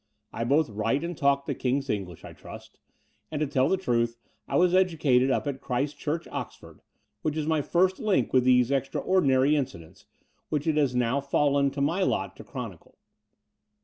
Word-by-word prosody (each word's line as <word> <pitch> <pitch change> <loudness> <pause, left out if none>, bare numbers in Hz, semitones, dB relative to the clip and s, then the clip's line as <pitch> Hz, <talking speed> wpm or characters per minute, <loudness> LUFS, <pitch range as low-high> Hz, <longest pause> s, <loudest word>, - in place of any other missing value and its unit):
I 115 - -3
both 140 0 +2
write 115 +8 -1
and 170 +1 -4
talk 140 -1 +1
the 140 - -2
King's 135 +2 -1
English, 95 - -4
I - - -10
trust; - - -12 0.5
and 150 - -4
to 155 - +1
tell 135 -2 +1
the 190 - +2
truth, 120 -9 0 0.3
I - - -3
was 180 0 +3
educated 155 -9 +3
up 130 - 0
at 140 -2 -4
Christ 135 +3 -2
Church, 160 +3 -3
Oxford, - - -8 0.4
which 155 0 -2
is 155 - -1
my 160 -1 +1
first 185 +5 +1
link 195 - +1
with 130 -1 +4
these 125 0 +4
extraordinary 135 0 +2
incidents, 130 - -5 0.4
which 150 -2 -1
it 160 -2 +1
has 140 -4 +1
now 125 +3 +1
fallen 140 0 +2
to 140 +1 -5
my 165 +7 +1
lot - - -1
to - - -10
chronicle. 115 - -9
140 Hz, 180 wpm, -27 LUFS, 125-155 Hz, 0.5 s, with